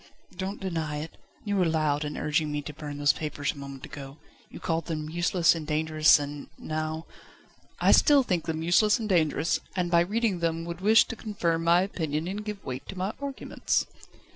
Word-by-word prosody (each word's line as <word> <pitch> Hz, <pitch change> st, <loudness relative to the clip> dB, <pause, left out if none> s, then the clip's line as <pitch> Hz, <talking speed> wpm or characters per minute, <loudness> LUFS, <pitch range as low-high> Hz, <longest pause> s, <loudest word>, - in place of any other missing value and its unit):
"Don't 195 Hz, +2 st, -4 dB
deny 160 Hz, -6 st, -3 dB
it. 155 Hz, +2 st, -6 dB, 0.3 s
You 205 Hz, -1 st, 0 dB
were 185 Hz, -, +3 dB
loud 155 Hz, -2 st, +1 dB
in 150 Hz, 0 st, -4 dB
urging 150 Hz, 0 st, 0 dB
me 145 Hz, 0 st, -2 dB
to 150 Hz, -, -7 dB
burn 145 Hz, -1 st, -7 dB
those 145 Hz, 0 st, +4 dB
papers 150 Hz, -2 st, -3 dB
a -, -, -15 dB
moment 140 Hz, -1 st, -8 dB
ago. 140 Hz, 0 st, -9 dB, 0.3 s
You -, -, -10 dB
called 165 Hz, -1 st, -2 dB
them 155 Hz, -2 st, -4 dB
useless 175 Hz, 0 st, +3 dB
and 160 Hz, -3 st, -6 dB
dangerous 155 Hz, 0 st, +4 dB
and 145 Hz, 0 st, -6 dB
now 155 Hz, +1 st, -4 dB, 0.4 s
..." -, -, -30 dB, 0.3 s
"I -, -, +4 dB
still 285 Hz, -2 st, +6 dB
think 180 Hz, -8 st, -1 dB
them 160 Hz, -1 st, -2 dB
useless 210 Hz, +7 st, +4 dB
and 220 Hz, -, -3 dB
dangerous, 165 Hz, -4 st, +2 dB, 0.2 s
and 180 Hz, -2 st, -1 dB
by 170 Hz, -, +6 dB
reading 205 Hz, +1 st, 0 dB
them 165 Hz, 0 st, -1 dB
would 170 Hz, +1 st, -6 dB
wish 220 Hz, +3 st, +6 dB
to -, -, -4 dB
confirm 170 Hz, -7 st, -1 dB
my 170 Hz, +2 st, +5 dB
opinion 160 Hz, -4 st, -2 dB
and 200 Hz, +3 st, -4 dB
give 210 Hz, -2 st, -6 dB
weight 130 Hz, 0 st, -5 dB
to 195 Hz, -, -7 dB
my 190 Hz, +4 st, -2 dB
arguments." 280 Hz, -1 st, -1 dB
165 Hz, 200 wpm, -27 LUFS, 150-185 Hz, 0.4 s, still